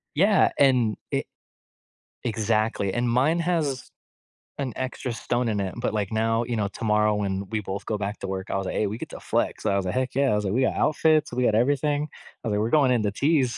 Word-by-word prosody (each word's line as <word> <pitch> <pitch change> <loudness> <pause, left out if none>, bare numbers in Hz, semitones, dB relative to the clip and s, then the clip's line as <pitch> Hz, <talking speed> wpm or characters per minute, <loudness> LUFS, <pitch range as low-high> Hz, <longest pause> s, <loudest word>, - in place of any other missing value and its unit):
Yeah, 195 +6 +4
and 125 -6 +4
it - - -1 1.0
Exactly, 110 -3 0
and 120 0 0
mine 135 +8 +2
has 160 -7 -1 0.7
an 130 -4 -2
extra 130 0 -3
stone 120 +1 -1
in 105 -2 0
it. 95 -2 -2
But, 120 -1 -2
like, 100 -3 -1
now 115 +1 +1
you 120 0 -3
know, 105 -2 0
tomorrow 105 0 +1
when 100 -1 -2
we 110 0 -1
both 100 0 -5
go 110 - -1
back 105 +1 -4
to - - -5
work, 95 0 -4
I - - 0
was 95 - -3
like, - - -3
"Hey, - - +1
we 105 +2 -4
get - - -6
to - - -9
flex." - - -1
I 100 -2 +2
was 100 -1 0
like, 90 - -2
"Heck 130 0 -1
yeah." 140 0 +3
I - - +3
was 105 - 0
like, 95 - -1
"We 130 - +2
got 130 - +1
outfits, 155 -2 +2
we 125 +1 0
got 110 - +3
everything." 145 +5 +1 0.3
I - - -3
was - - 0
like, 105 - +1
"We're 110 - 0
going 140 -2 +4
in 120 -3 +2
to 105 - 0
tease." 135 +1 +1
115 Hz, 245 wpm, -25 LUFS, 105-135 Hz, 1.0 s, Yeah